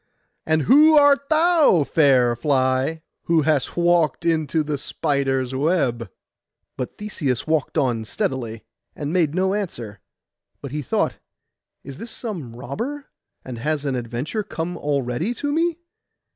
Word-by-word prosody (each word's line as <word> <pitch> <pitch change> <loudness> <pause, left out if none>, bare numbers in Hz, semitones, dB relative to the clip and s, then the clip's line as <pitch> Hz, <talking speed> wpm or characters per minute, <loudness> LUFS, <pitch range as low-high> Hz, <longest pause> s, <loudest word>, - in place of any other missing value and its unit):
'And 160 -1 +2
who 305 - +6
art 280 -1 +4
thou, 315 - +4
fair 130 -6 +3
fly, 130 +4 0 0.2
who 165 -2 +3
hast 150 -1 0
walked 170 -4 +2
into 160 -1 +1
the 150 -1 -3
spider's 135 -2 -1
web?' 130 - 0 0.7
But 125 - -5
Theseus 150 - -2
walked 160 0 -1
on 125 -6 +1
steadily, 115 -2 -3 0.3
and 150 +1 -4
made 165 -4 +1
no 190 +1 +1
answer; 120 - -4 0.6
but 140 - -8
he 150 +1 -3
thought, 130 - -1 0.6
'Is 135 0 -10
this 230 - -7
some 175 - -6
robber? 235 - -6 0.3
and 125 -3 -7
has 150 +3 -2
an 135 -2 -1
adventure 125 - -3
come 175 -4 -5
already 145 - -2
to 290 +4 -2
me? 330 +1 +1
150 Hz, 135 wpm, -22 LUFS, 130-185 Hz, 0.7 s, who